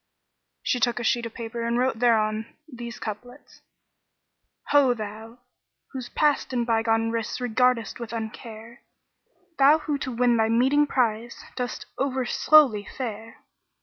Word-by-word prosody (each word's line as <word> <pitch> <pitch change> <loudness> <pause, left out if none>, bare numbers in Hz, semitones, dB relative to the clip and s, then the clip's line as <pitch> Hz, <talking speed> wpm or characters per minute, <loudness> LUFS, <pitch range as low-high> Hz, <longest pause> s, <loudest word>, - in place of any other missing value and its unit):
So - - -54
she 250 - 0
took 240 0 +1
a - - -4
sheet 235 +1 +1
of 225 - -14
paper 235 0 -5
and 235 +1 0
wrote 250 -2 0
thereon 220 -2 +2 0.2
these 240 -4 -8
couplets, 245 +6 -9 1.1
"Ho 275 -4 +4
thou, 220 +2 -8 0.5
who 265 - -5 0.2
past 295 -3 +1
and 240 -2 0
bygone 225 -1 +1
risks 230 +1 -3
regardest 245 -2 +1
with 235 -2 -6
uncare! 225 0 -7 0.4
* 370 -8 -41
Thou 280 +3 +7
who 300 -2 -3
to 260 - -4
win 240 0 +2
thy 220 0 +2
meeting 265 +6 +3
prize 235 -3 -1 0.2
dost 250 -1 -4
overslowly 265 -2 +3
fare! 225 -3 -6
235 Hz, 145 wpm, -25 LUFS, 225-255 Hz, 1.1 s, Thou